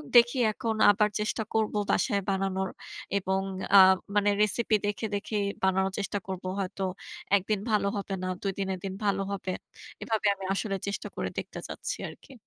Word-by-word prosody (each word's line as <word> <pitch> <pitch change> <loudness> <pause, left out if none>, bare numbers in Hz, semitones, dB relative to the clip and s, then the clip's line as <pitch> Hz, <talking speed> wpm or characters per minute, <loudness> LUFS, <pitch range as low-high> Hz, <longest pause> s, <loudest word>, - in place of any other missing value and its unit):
দেখি 240 +2 +7
এখন 225 -1 -2 0.2
আবার 210 +1 +2
চেষ্টা 215 +1 -1
করব 220 -1 +1 0.2
বাসায় 200 -5 +2
বানানোর 190 -1 0 0.5
এবং 190 0 0 0.4
আ - - +11 0.4
মানে 205 0 +4
রেসিপি 215 +1 +2
দেখে, 205 +2 -2
দেখেই 205 0 -1 0.2
বানানোর 190 0 +2
চেষ্টা 205 0 -2
করব। 190 -1 -5 0.2
হয়তো 195 0 -3 0.5
১ 200 - +3
দিন 210 -2 +2
ভালো 210 -2 +3
হবে 195 -1 -3
না - - -1
২ 195 - 0
দিনের 190 -1 -2
দিন 190 - -3
ভালো 195 -1 +2
হবে, 190 -1 -3 0.5
এভাবে 220 -2 0
আমি 195 - -7
আসলে 195 0 -1
চেষ্টা 200 - -3
করে - - -2
দেখতে - - -7
চাচ্ছি - - -4
আর - - -10
কি। - - -14
200 Hz, 175 wpm, -28 LUFS, 190-215 Hz, 0.5 s, আ